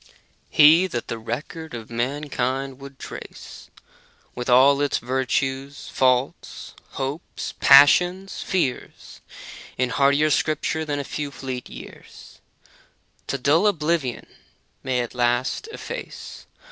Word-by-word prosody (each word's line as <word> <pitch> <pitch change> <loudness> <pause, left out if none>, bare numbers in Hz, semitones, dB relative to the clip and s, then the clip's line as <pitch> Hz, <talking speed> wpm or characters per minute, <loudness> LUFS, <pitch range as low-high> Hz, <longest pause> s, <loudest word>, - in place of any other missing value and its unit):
He 160 +5 +6
that 120 -9 -5
the 115 - -4
record 140 +6 -6
of 115 -1 -9
mankind 135 +1 -2
would 140 0 -11
trace, - - -10 0.6
With 125 +1 -5
all 135 +3 +5
its 145 - +1
virtues, 130 +2 -2
faults, 130 0 0 0.2
hopes, 140 +5 -5
passions, 180 +7 +5
fears. 170 -10 -3 0.6
In 125 0 0
hardier 140 +4 +3
scripture 155 +2 0
than 145 -1 -2
a 140 - -3
few 145 +1 -4
fleet 130 -3 -6
years - - -13 0.9
To 140 - -2
dull 150 +9 +3
oblivion 155 - -1 0.6
may 130 -2 -1
at 120 - -6
last 120 - 0
efface. 485 +2 -8
140 Hz, 110 wpm, -23 LUFS, 125-150 Hz, 0.9 s, He